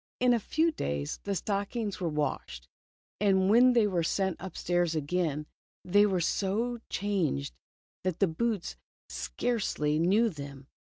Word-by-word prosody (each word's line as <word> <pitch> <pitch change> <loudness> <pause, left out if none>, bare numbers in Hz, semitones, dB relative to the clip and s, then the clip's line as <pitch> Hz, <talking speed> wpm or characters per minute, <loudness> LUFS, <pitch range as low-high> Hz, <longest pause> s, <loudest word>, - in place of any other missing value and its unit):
In 250 0 +4
a 235 - +2
few 320 +9 +1
days 70 - -3
the 200 -1 -1
stockings 205 +2 -2
were 170 - 0
washed, 135 - -3 0.5
and 195 -1 +3
when 250 +3 +6
they 230 -3 +4
were 185 -4 +1
sent 190 +2 0
upstairs 175 -2 -1
again, 155 -1 -1 0.4
they 205 +3 +5
were 190 -3 +1
so 215 +7 0
changed, 180 - -1 0.5
that 185 -2 -1
the 195 - +4
boots 200 +3 -2 0.3
scarcely 155 -11 -1
knew 200 +8 +4
them. 140 -5 -9
190 Hz, 135 wpm, -29 LUFS, 160-210 Hz, 0.5 s, when